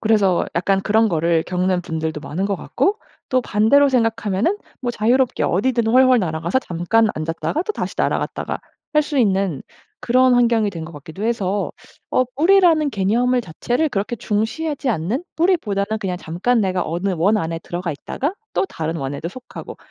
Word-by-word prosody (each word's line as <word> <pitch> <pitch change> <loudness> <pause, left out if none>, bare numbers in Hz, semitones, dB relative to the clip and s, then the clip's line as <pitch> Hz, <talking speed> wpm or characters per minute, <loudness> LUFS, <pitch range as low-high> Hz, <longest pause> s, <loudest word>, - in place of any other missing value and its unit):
그래서 205 -5 +2
약간 195 +3 +1
그런 220 +2 +3
거를 165 -2 +1
겪는 180 0 0
분들도 160 -2 -3
많은 180 +6 -3
것 200 -1 -1
같고 410 - 0 0.3
또 255 - +3
반대로 240 +7 +4
생각하면은 225 - +1 0.3
뭐 245 - 0
자유롭게 240 +3 +1
어디든 230 +4 +1
훨훨 255 +1 +5
날아가서 170 +6 -1
잠깐 200 +4 +1
앉았다가 165 - -2
또 430 - -3
다시 - - -4
날아갔다가 - - -1 0.4
할 300 - +5
수 295 -1 -2
있는 195 - +1 0.4
그런 255 +1 +4
환경이 230 -3 +3
된 165 -4 -6
것 165 - -10
같기도 160 +7 -8
해서 205 -4 -1 0.4
어 255 - +3
뿌리라는 330 -3 +4
개념의 240 +5 +1
자체를 245 - -1
그렇게 205 +3 -2
중시하지 235 +7 -2
않는 220 - -2
뿌리보다는 220 - +1
그냥 185 -3 -2
잠깐 185 +10 0
내가 185 -3 0
어느 175 +5 -1
원 200 +7 +3
안에 165 -3 -3
들어가 175 +1 -4
있다가 285 - -3 0.2
또 - - +2
다른 160 - -4
원에도 140 +2 -4
속하고 255 +7 -10
210 Hz, 370 characters per minute, -20 LUFS, 175-255 Hz, 0.4 s, 훨훨